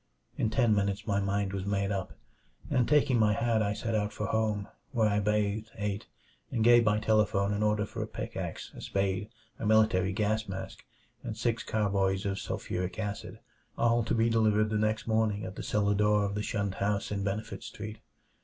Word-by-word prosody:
In 110 Hz, -, 0 dB
ten 120 Hz, -1 st, +3 dB
minutes 100 Hz, +1 st, 0 dB
my 100 Hz, -2 st, +1 dB
mind 100 Hz, 0 st, -1 dB
was 95 Hz, -1 st, -2 dB
made 100 Hz, 0 st, 0 dB
up, 95 Hz, -2 st, -3 dB, 0.6 s
and 125 Hz, -2 st, +2 dB
taking 145 Hz, -4 st, +4 dB
my 105 Hz, -1 st, +4 dB
hat 115 Hz, +1 st, +1 dB
I 105 Hz, -1 st, +1 dB
set 115 Hz, +2 st, -3 dB
out 105 Hz, -1 st, 0 dB
for 105 Hz, -, -4 dB
home, 110 Hz, -2 st, 0 dB, 0.3 s
where 115 Hz, -3 st, +3 dB
I 105 Hz, 0 st, +2 dB
bathed, 105 Hz, +1 st, 0 dB
ate, 100 Hz, -1 st, -3 dB, 0.4 s
and 115 Hz, -3 st, 0 dB
gave 120 Hz, 0 st, +7 dB
by 105 Hz, -1 st, +3 dB
telephone 105 Hz, -2 st, +2 dB
an 105 Hz, -, -1 dB
order 105 Hz, 0 st, +2 dB
for -, -, -6 dB
a -, -, -3 dB
pickax, -, -, -5 dB
a -, -, -9 dB
spade, 95 Hz, +1 st, -1 dB, 0.3 s
a -, -, -3 dB
military 110 Hz, -4 st, +4 dB
gas 110 Hz, +2 st, 0 dB
mask, 95 Hz, 0 st, -6 dB, 0.4 s
and 110 Hz, -, -5 dB
six 115 Hz, 0 st, 0 dB
carboys 100 Hz, -2 st, 0 dB
of 100 Hz, 0 st, -1 dB
sulfuric 90 Hz, +2 st, -3 dB
acid, 105 Hz, -2 st, -5 dB, 0.4 s
all 120 Hz, 0 st, +3 dB
to -, -, 0 dB
be 115 Hz, 0 st, +3 dB
delivered 110 Hz, -2 st, +3 dB
the 105 Hz, -, +1 dB
next 110 Hz, +1 st, 0 dB
morning 110 Hz, -2 st, +1 dB
at 95 Hz, -, -7 dB
the -, -, -5 dB
cellar 105 Hz, -1 st, +1 dB
door 105 Hz, 0 st, +3 dB
of 100 Hz, -, -2 dB
the 105 Hz, -, -2 dB
shunned 100 Hz, -2 st, -2 dB
house 100 Hz, 0 st, 0 dB
in 100 Hz, -1 st, -1 dB
Benefit 105 Hz, +3 st, -3 dB
Street. 110 Hz, +1 st, -7 dB
105 Hz, 195 wpm, -30 LUFS, 100-110 Hz, 0.6 s, gave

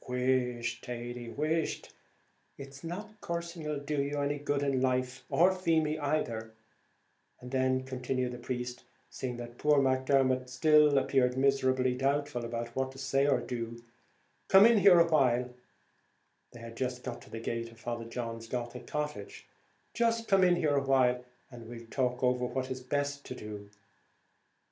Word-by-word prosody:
"Whisht, 125 Hz, -2 st, 0 dB
Thady, 120 Hz, 0 st, -6 dB
whisht! 155 Hz, +5 st, -2 dB, 0.6 s
it's 135 Hz, 0 st, -10 dB
not 210 Hz, +6 st, -7 dB
cursing 170 Hz, -3 st, -4 dB
'll 150 Hz, -, -1 dB
do 145 Hz, 0 st, -2 dB
you 145 Hz, +1 st, -2 dB
any 145 Hz, +1 st, -1 dB
good 145 Hz, 0 st, -1 dB
in 135 Hz, -2 st, +1 dB
life, 130 Hz, 0 st, 0 dB
or 180 Hz, +3 st, +4 dB
Feemy 160 Hz, -4 st, +1 dB
either;" 115 Hz, -7 st, -2 dB, 0.8 s
and 125 Hz, -, -10 dB
then 130 Hz, 0 st, +1 dB
continued 130 Hz, -1 st, -2 dB
the 125 Hz, -, -7 dB
priest, 125 Hz, 0 st, -5 dB, 0.3 s
seeing 125 Hz, -2 st, -4 dB
that 120 Hz, 0 st, -9 dB
poor 150 Hz, -1 st, +4 dB
Macdermot 130 Hz, -1 st, +2 dB
still 150 Hz, +2 st, +5 dB
appeared 130 Hz, -1 st, +2 dB
miserably 130 Hz, -2 st, +2 dB
doubtful 140 Hz, 0 st, 0 dB, 0.3 s
what 130 Hz, +1 st, -1 dB
to -, -, -13 dB
say 135 Hz, +1 st, +1 dB
or 145 Hz, -, +3 dB
do, 115 Hz, -1 st, -5 dB, 0.7 s
"come 195 Hz, +2 st, +8 dB
in 230 Hz, -2 st, +6 dB
here 185 Hz, -3 st, +7 dB
awhile," 125 Hz, -7 st, +3 dB, 1.0 s
they 120 Hz, -, -12 dB
had 115 Hz, 0 st, -9 dB
just 125 Hz, 0 st, -3 dB
got 125 Hz, -2 st, -6 dB
to -, -, -15 dB
the 115 Hz, -, -6 dB
gate 115 Hz, 0 st, -4 dB
of 115 Hz, -, -18 dB
Father 115 Hz, 0 st, -4 dB
John's 115 Hz, -1 st, -5 dB
Gothic 120 Hz, 0 st, -5 dB
cottage, 150 Hz, -, -5 dB, 0.5 s
"just 230 Hz, -1 st, +1 dB
come 195 Hz, -2 st, +4 dB
in 180 Hz, -1 st, +5 dB
here 155 Hz, -4 st, +1 dB
awhile, 130 Hz, -2 st, +2 dB, 0.3 s
and 120 Hz, -2 st, -10 dB
we'll 115 Hz, -1 st, -9 dB
talk 125 Hz, -1 st, -1 dB
over 125 Hz, 0 st, +2 dB
what 130 Hz, +1 st, -3 dB
will 130 Hz, -, -2 dB
be 130 Hz, -, -10 dB
best 145 Hz, +1 st, -2 dB
to 130 Hz, -, -6 dB
do." 105 Hz, -3 st, -8 dB
130 Hz, 160 wpm, -31 LUFS, 125-145 Hz, 1.0 s, come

